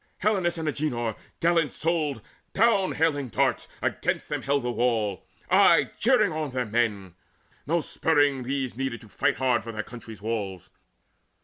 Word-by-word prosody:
Helenus 185 -5 +1
and 160 -1 -3
Agenor 120 -7 -1 0.3
gallant 165 -2 +3
souled, 155 -8 -1 0.3
Down 205 -3 +3
hailing 145 -5 +1
darts, - - +1 0.2
against - - -1
them - - -2
held 140 -1 0
the 125 - -1
wall, 115 -5 0 0.2
Aye - - +5
cheering - - +3
on 155 -1 -2
their 125 -1 -2
men. 105 -5 -1 0.5
No 170 +2 +2
spurring 145 -4 +1
these 130 -1 -2
Needed 130 -2 -3
to 115 - -14
fight - - +1
hard 130 -3 +1
for 115 - -6
their 110 -1 -4
country's 115 -3 -10
walls. 100 -4 -4
130 Hz, 150 wpm, -26 LUFS, 115-155 Hz, 0.5 s, Aye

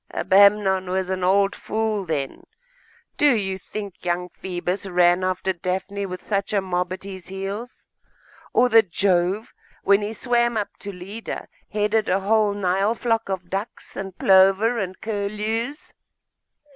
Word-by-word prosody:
'Abamnon 195 -1 +4
was 185 0 -1
an 185 -1 -2
old 195 +2 +3
fool, 215 -2 -2
then. 145 -5 -3 0.7
Do 290 -4 +5
you 190 -3 -2
think 200 0 -8
young 180 0 -1
Phoebus 180 +2 -4
ran 175 0 +3
after 185 +1 0
Daphne 190 +3 -3
with 185 0 -7
such 200 0 -1
a 205 - +3
mob 180 -1 -2
at 185 - -5
his 190 -2 -8
heels? 195 +5 -6 0.6
or 250 - +4
that 225 -4 +5
Jove, 185 +3 +1 0.3
when 200 +1 +4
he 210 +2 -3
swam 240 0 +1
up 210 - -1
to 200 - -5
Leda, 195 +5 -7 0.2
headed 210 +1 0
a 190 +2 +2
whole 210 0 +2
Nile 195 +3 +1
flock 225 -3 -1
of 185 -2 -4
ducks, 195 +4 -5
and 190 -1 -6
plover, 195 +5 +4
and 185 -2 -4
curlews? 215 +5 -3
195 Hz, 145 wpm, -23 LUFS, 185-215 Hz, 0.7 s, Do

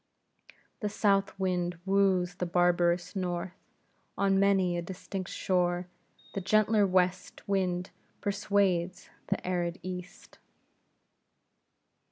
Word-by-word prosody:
The 210 - -2
south 200 -2 +1
wind 180 -2 -1
wooes 190 -2 +2
the 180 - -2
barbarous 175 0 +2
north; 180 -1 -2 0.6
on 195 -1 +3
many 195 -3 +3
a 175 - -1
distant 185 +1 -6
shore 180 -1 0 0.5
the 195 - -3
gentler 215 +1 +3
west 180 0 0
wind 185 -2 0 0.3
persuades 200 -3 0 0.2
the - - -2
arid 175 -1 -1
east. 180 0 -8
185 Hz, 100 wpm, -30 LUFS, 175-195 Hz, 0.6 s, on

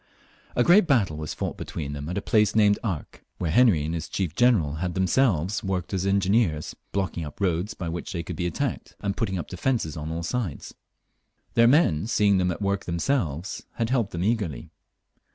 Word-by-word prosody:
A 120 - +4
great 180 - +6
battle 110 - +2
was 75 -1 -5
fought - - -3
between 70 -3 -5
them 70 +2 -5
at 90 - -3
a 100 - -2
place 105 -2 +2
named 105 -2 +4
Arques, 95 -10 -4 0.2
where 85 -4 -1
Henry 100 -8 +4
and 80 - -2
his 85 -1 -4
chief 90 -6 -2
general 90 -11 +3
had 90 +1 -3
themselves 95 - +1
worked 95 -1 -2
as 95 0 0
engineers, 95 -5 +1 0.2
blocking 95 -4 -2
up 75 -1 -9
roads 90 +1 0
by 85 - -5
which 85 +1 -4
they 85 -2 -3
could 90 - -6
be 90 +2 -1
attacked, 85 - -3
and 100 -1 -1
putting 95 -5 -1
up 85 - -4
defences 90 - -1
on 75 +1 -5
all 85 +1 -3
sides. 95 - -3 0.8
Their 115 0 +5
men, 115 - +3
seeing 100 -4 +3
them 90 0 +1
at 90 +4 -3
work 100 0 0
themselves, 85 - -2
had 115 0 -2
helped 120 -6 +1
them 85 -2 -3
eagerly. 105 -7 -1
95 Hz, 195 wpm, -25 LUFS, 85-110 Hz, 0.8 s, great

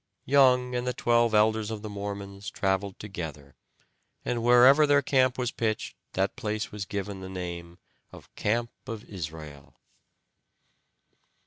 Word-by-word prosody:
Young 125 -2 +4
and 125 0 -2
the 125 - -1
twelve 120 -1 +2
elders 110 0 +3
of 110 -1 -5
the - - -4
Mormons 100 -1 -6
traveled 95 0 -1
together, 80 -9 -7 0.7
and 120 -1 -1
wherever 125 +5 +6
their 145 -1 +4
camp 130 -1 +2
was 125 -1 -1
pitched 110 -2 -2 0.2
that 95 +1 0
place 110 -3 -3
was 105 -2 -5
given 100 -1 -4
the 95 - -7
name 85 -2 -6 0.3
of - - -15
"Camp 115 +3 -1 0.2
of 115 -3 -6
Israel." 80 -6 -8
105 Hz, 135 wpm, -27 LUFS, 95-120 Hz, 0.7 s, wherever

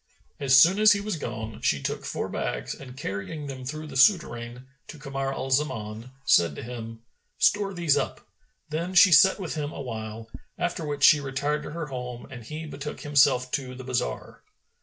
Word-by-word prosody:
As 135 -1 +6
soon 180 +8 +6
as 215 0 +7
he 205 - -1
was 205 -1 -3
gone, 110 -7 -6
she 70 - +1
took - - -4
four - - -3
bags - - -3
and, 130 -1 -11
carrying 135 +6 -5
them 135 -2 -7
through 155 +4 -5
the 150 - -10
Souterrain 125 - +2 0.2
to 155 - -10
Kamar 135 -1 -3
al 135 0 -4
Zaman, 120 -5 -1 0.2
said 85 - +4
to - - -7
him, 115 -1 -8 0.3
"Store 205 -1 +2
these 170 -6 +2
up;" - - -3 0.4
then 170 +4 -3
she 185 +1 +8
sat 190 +5 +6
with 180 -4 -4
him 150 -2 -3
awhile, 110 -5 -6 0.3
after 175 -1 -2
which 145 -1 -3
she 150 - +8
retired 145 +2 -2
to - - -7
her 165 -1 -4
home 125 -3 -6
and 120 -3 -9
he 155 +6 -6
betook 150 -1 -7
himself 135 -3 +3
to 130 -3 -3
the 130 - -9
bazar. 125 - -3
135 Hz, 185 wpm, -26 LUFS, 125-155 Hz, 0.4 s, she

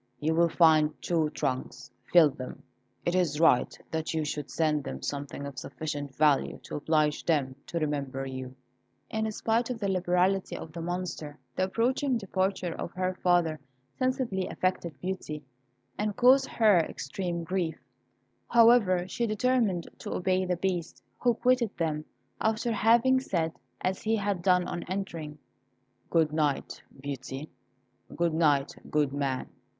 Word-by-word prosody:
You 155 +2 +1
will 170 +1 +4
find 155 -2 +4
two 160 -3 +1
trunks; 130 -3 -3 0.2
fill 165 -4 +7
them. 130 -1 -8 0.4
It 175 - +1
is 170 -5 +1
right 165 -6 +4
that 160 +1 -2
you 155 -1 0
should 150 -1 -4
send 155 -3 +1
them 65 0 -6
something 140 0 -4
of 140 -2 -6
sufficient 145 -3 -5
value 150 -2 +3
to - - -7
oblige 150 0 +1
them 140 -5 +1
to 170 - -3
remember 140 -4 -2
you." 130 -1 -6 0.6
In 220 0 -1
spite 225 +3 0
of 250 - -2
the 200 - -1
liberality 185 +1 +1
of 160 - -8
the 170 - -5
Monster, 170 -4 -4 0.2
the 185 - +2
approaching 250 +6 +1
departure 190 -3 -1
of 170 - -5
her 185 0 -1
father 175 -4 +2 0.4
sensibly 255 -7 0
affected 175 -5 -2
Beauty, 180 -5 -4 0.6
and 210 -1 -1
caused 265 +3 +5
her 215 -6 +4
extreme 170 +3 -3
grief; 170 -1 -1 0.7
however, 225 -7 +5
she 235 +5 -1
determined 215 -5 +1
to - - -5
obey 185 +1 +1
the 180 -1 0
Beast, 175 -2 -2 0.2
who 240 -2 +3
quitted 245 -2 +1
them, 155 -2 -1 0.3
after 220 +2 0
having 235 +4 +4
said, 165 -10 -1 0.3
as 190 +1 -1
he 220 +1 +1
had 200 -4 -1
done 180 0 +3
on 175 - -3
entering, 170 -6 -4 0.7
"Good 160 -2 +2
night, 150 -3 -1 0.2
Beauty; 135 +1 -6 0.6
good 170 -1 +1
night, 145 -4 +2 0.2
good 145 -2 +1
man." 135 -2 -1
175 Hz, 145 wpm, -29 LUFS, 150-195 Hz, 0.7 s, fill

